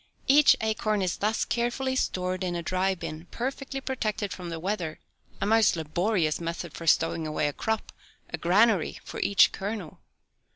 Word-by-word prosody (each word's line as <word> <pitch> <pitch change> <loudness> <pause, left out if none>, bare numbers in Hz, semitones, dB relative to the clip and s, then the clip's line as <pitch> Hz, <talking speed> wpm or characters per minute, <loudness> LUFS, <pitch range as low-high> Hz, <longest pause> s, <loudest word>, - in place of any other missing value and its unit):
Each 290 +2 +7
acorn 215 -2 0
is 180 - -1
thus 215 +2 0
carefully 245 +3 -1
stored 185 -6 -1
in 175 -1 -2
a 170 - -3
dry 190 +2 0
bin, 160 -1 -7
perfectly 270 +2 -4
protected 215 -7 -2
from 180 -2 -7
the 165 -1 -5
weather, 175 -3 -3 0.4
a - - -1
most 220 -1 +4
laborious 170 +1 0
method 170 -1 -5
of 165 - +2
stowing 165 -1 +2
away 155 -1 0
a 145 - -2
crop, 220 +6 -2 0.4
a - - -4
granary 195 +1 +3
for - - -7
each 200 -1 +5
kernel. 200 -4 -5
190 Hz, 165 wpm, -27 LUFS, 170-220 Hz, 0.4 s, Each